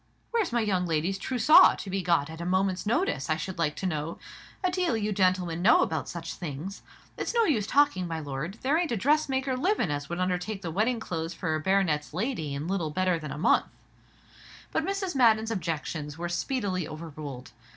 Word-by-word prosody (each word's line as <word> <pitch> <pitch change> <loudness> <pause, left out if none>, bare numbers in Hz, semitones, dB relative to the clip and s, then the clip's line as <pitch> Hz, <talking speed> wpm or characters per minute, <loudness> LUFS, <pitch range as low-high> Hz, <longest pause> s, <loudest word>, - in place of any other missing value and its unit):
"Where's 455 - +1
my 235 0 +2
young 185 -4 0
lady's 165 +4 0
trussaw 300 - +6
to 195 - -7
be 195 0 0
got 165 -4 +1
at 160 +1 -8
a - - -3
moment's 185 +2 0
notice, 220 - 0
I 155 - +3
should 180 +3 -5
like 150 -3 +1
to 190 - -5
know? 160 -2 -2 0.5
A 365 - +2
deal 355 -9 +1
you 210 -1 -1
gentlemen 185 -3 +1
know 205 - +6
about 160 -3 -2
such 170 -1 -5
things. 170 +4 -6 0.4
It's - - -3
no 465 - +5
use 220 - +1
talking, 275 -11 +3
my 165 -1 -3
lord, 145 +5 -5
there 285 +5 +3
ain't 345 -5 -1
a 235 - 0
dressmaker 270 +1 +1
livin' 315 - +1
as 145 -1 -3
would 175 - -3
undertake 185 +3 -2
the 165 - -3
wedding 225 +7 +1
clothes 165 -4 -4
for 160 -3 -1
baronet's 160 -4 +1
lady 180 - -2
in 145 +3 -4
little 180 -4 -1
better 180 +1 +1
than 150 -3 -6
a - - -5
month." 155 - +3 1.0
But - - 0
Mrs. 390 -1 -2
Madden's 225 -4 +4
objections 155 -5 -3
were 175 +1 -3
speedily 185 - -1
overruled. 155 -5 -8
185 Hz, 195 wpm, -28 LUFS, 160-230 Hz, 1.0 s, trussaw